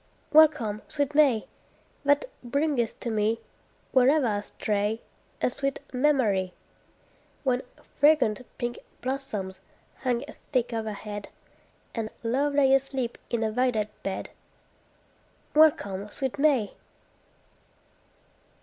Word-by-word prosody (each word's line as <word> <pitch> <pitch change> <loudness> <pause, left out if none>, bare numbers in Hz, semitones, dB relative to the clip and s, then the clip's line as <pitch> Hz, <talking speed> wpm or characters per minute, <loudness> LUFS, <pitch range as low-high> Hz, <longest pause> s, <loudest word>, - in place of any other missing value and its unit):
Welcome, 290 -9 +5
sweet 285 -2 -1
May! 275 -7 +4 0.6
That 285 +1 +4 0.2
bringest 275 -2 0
to 235 - -2
me, 220 +1 +1 0.5
Wherever 270 +3 +5
I 205 -3 0
stray, 210 +1 -1 0.4
A - - +3
sweet 275 +1 -2
memory, 245 -10 +2 0.9
When 255 -2 +2 0.4
fragrant 290 -6 +4 0.2
pink 240 0 -3 0.2
blossoms 240 -8 -3 0.4
hung 250 0 -1 0.3
thick 245 -3 +1
overhead, 210 -2 -4 0.6
And 225 -2 -3
love 275 +5 +1
lay 270 -2 +5
asleep 270 -3 0
in 235 -1 0
a 220 - 0
violet 225 -3 +1
bed. 190 -1 -4 1.2
Welcome, 205 -11 +3
sweet 265 +4 -3
May! 275 -9 +3
245 Hz, 100 wpm, -27 LUFS, 215-280 Hz, 1.2 s, Welcome